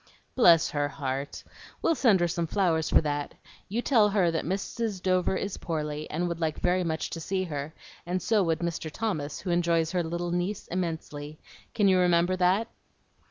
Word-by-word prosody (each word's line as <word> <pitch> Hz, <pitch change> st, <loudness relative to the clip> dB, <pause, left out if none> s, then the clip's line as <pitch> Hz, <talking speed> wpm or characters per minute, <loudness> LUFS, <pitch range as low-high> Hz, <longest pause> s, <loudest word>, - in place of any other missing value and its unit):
"Bless 170 Hz, -10 st, +6 dB
her 145 Hz, -1 st, 0 dB
heart! 140 Hz, -1 st, -4 dB, 0.4 s
We'll -, -, +4 dB
send 225 Hz, -, +3 dB
her 175 Hz, -, +3 dB
some 170 Hz, 0 st, -2 dB
flowers 165 Hz, -4 st, +1 dB
for -, -, +5 dB
that. 145 Hz, -1 st, -3 dB, 0.3 s
You 230 Hz, +5 st, -2 dB
tell 220 Hz, -6 st, +4 dB
her 195 Hz, -4 st, +2 dB
that 165 Hz, -, -2 dB
Mrs. 200 Hz, +3 st, -2 dB
Dover 185 Hz, 0 st, +1 dB
is 200 Hz, 0 st, -3 dB
poorly, 150 Hz, -2 st, -4 dB
and 175 Hz, +3 st, -1 dB
would 170 Hz, -1 st, -4 dB
like 160 Hz, -2 st, -1 dB
very 180 Hz, +1 st, +1 dB
much 160 Hz, -2 st, -2 dB
to 165 Hz, -, -4 dB
see 190 Hz, +3 st, -2 dB
her; 150 Hz, -2 st, -5 dB, 0.3 s
and 180 Hz, +1 st, -2 dB
so 215 Hz, +2 st, +2 dB
would 165 Hz, -3 st, 0 dB
Mr. 170 Hz, -2 st, -3 dB
Thomas, 155 Hz, -8 st, -3 dB
who 185 Hz, -, -3 dB
enjoys 170 Hz, -2 st, +2 dB
her 180 Hz, -, +1 dB
little 170 Hz, +1 st, -3 dB
niece 175 Hz, +4 st, -2 dB
immensely. 160 Hz, -4 st, -4 dB, 0.4 s
Can 205 Hz, -3 st, +3 dB
you 185 Hz, -1 st, +4 dB
remember 175 Hz, 0 st, +3 dB
that?" 185 Hz, +5 st, +2 dB
175 Hz, 185 wpm, -28 LUFS, 160-190 Hz, 0.4 s, Bless